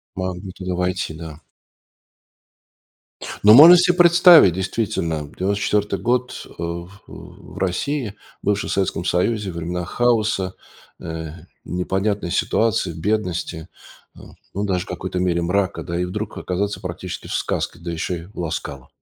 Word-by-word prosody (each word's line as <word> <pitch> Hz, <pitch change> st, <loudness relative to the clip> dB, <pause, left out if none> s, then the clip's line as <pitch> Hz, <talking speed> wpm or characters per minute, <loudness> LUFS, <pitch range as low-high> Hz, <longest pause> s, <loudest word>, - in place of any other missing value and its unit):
Могли 95 Hz, 0 st, -4 dB
туда 90 Hz, 0 st, -5 dB
войти, 90 Hz, -1 st, -2 dB
да. 80 Hz, -1 st, -9 dB, 2.0 s
Но 105 Hz, +1 st, +8 dB
можно 165 Hz, +8 st, +10 dB
се 180 Hz, +1 st, +4 dB
представить, 175 Hz, -, +7 dB
действительно, 85 Hz, -5 st, -2 dB
94-й 100 Hz, +2 st, 0 dB
год, 125 Hz, +1 st, -1 dB
э, -, -, -18 dB
в 85 Hz, +1 st, -4 dB
э, 100 Hz, -, -16 dB
в -, -, -13 dB
России, 105 Hz, +5 st, -2 dB, 0.3 s
бывшей 100 Hz, -1 st, -1 dB
в -, -, -1 dB
Советском 95 Hz, -3 st, -1 dB
Союзе- 100 Hz, +2 st, 0 dB
времена 85 Hz, +1 st, -4 dB
хаоса, 110 Hz, -4 st, +1 dB, 0.5 s
э, 80 Hz, -1 st, -6 dB, 0.3 s
непонятной 95 Hz, +1 st, -2 dB
ситуации, 115 Hz, -3 st, +1 dB
бедности, 90 Hz, -3 st, -2 dB, 0.5 s
э, -, -, -15 dB, 0.3 s
ну, 100 Hz, -, -2 dB
даже 95 Hz, -2 st, -1 dB
в -, -, -25 dB
какой-то 90 Hz, 0 st, -4 dB
мере 90 Hz, -1 st, +1 dB
мрака, 95 Hz, +3 st, -1 dB
да, 85 Hz, 0 st, -4 dB
и 90 Hz, -, 0 dB
вдруг 105 Hz, +4 st, -5 dB
оказаться 100 Hz, +3 st, -2 dB
практически 90 Hz, 0 st, -6 dB
в -, -, -5 dB
сказке, 85 Hz, -, -2 dB
да 85 Hz, 0 st, -5 dB
еще 85 Hz, +2 st, -3 dB
и -, -, -12 dB
в 100 Hz, -, -19 dB
"Ла 85 Hz, -2 st, -2 dB
Скала". 75 Hz, -, -6 dB
95 Hz, 145 wpm, -21 LUFS, 85-105 Hz, 2.0 s, можно